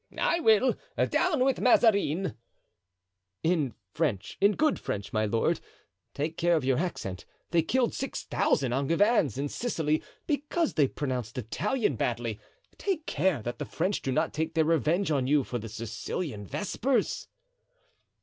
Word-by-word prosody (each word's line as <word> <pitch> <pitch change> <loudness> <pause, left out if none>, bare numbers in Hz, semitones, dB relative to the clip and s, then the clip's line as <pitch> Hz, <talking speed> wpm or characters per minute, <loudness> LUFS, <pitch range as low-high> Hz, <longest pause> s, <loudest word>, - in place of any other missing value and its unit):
'" - - -20
"I 335 - +2
will: 225 -3 +4 0.4
'Down 310 -8 +2
with 270 -1 +1
Mazarin'" 200 - +3 1.1
"In 160 - +1 0.2
French, 125 - -1
in 200 +1 +5
good 305 +6 +2
French, 100 0 -4
my 110 0 +1
lord, 115 +2 +1 0.6
take 155 +3 -2
care 175 0 +3
of 155 -5 0
your 130 0 +2
accent; 100 - -3 0.3
they 170 -1 +4
killed 245 +8 +1
six 270 - -4
thousand 130 -4 +1
Angevins 165 - +2
in 140 +1 -1
Sicily 155 - -1 0.2
because 300 +3 0
they 145 -4 +4
pronounced 125 -4 -4
Italian 140 - -1
badly. 115 -2 -2 0.4
Take 365 -6 -1
care 155 - +1
that 120 +4 -4
the 145 - -3
French 185 +8 -1
do 135 - -2
not 155 +4 0
take 160 +1 -2
their 160 -1 +3
revenge 165 +3 +2
on 135 -4 +1
you 145 0 +3
for 120 -1 -4
the 115 +1 -7
Sicilian 110 - -5
vespers." 225 - -1
160 Hz, 150 wpm, -28 LUFS, 125-205 Hz, 1.1 s, in